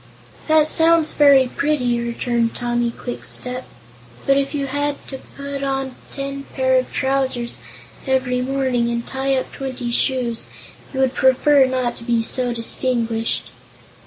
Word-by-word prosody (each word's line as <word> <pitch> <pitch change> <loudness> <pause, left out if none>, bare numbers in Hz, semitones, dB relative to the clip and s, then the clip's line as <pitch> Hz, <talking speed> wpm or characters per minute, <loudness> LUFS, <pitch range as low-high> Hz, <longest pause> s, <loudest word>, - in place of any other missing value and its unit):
"That 310 -1 +5
sounds 325 0 +3
very 280 -3 +6
pretty," 250 -4 0
returned 235 0 -1
Tommy 240 -1 0
Kwikstep, 250 +1 -5 0.6
"but 275 - +4
if 275 0 0
you 280 -1 -1
had 285 +1 -1
to 265 - -6 0.2
put 280 0 -5
on 270 -1 -2 0.2
ten 275 0 -5
pair 260 -1 +3
of 255 - -4
trousers 265 -3 -1 0.5
every 255 -1 +1
morning, 255 -2 0
and 235 0 -2
tie 270 0 0
up 260 - -2
twenty 260 -3 -4
shoes, 240 -2 0 0.4
you 265 - -1
would 265 -1 +2
prefer 265 +1 +4
not 255 -2 -1
to - - -9
be 230 -1 +1
so 245 +2 -1
distinguished." 230 -1 0
260 Hz, 140 wpm, -20 LUFS, 240-275 Hz, 0.6 s, very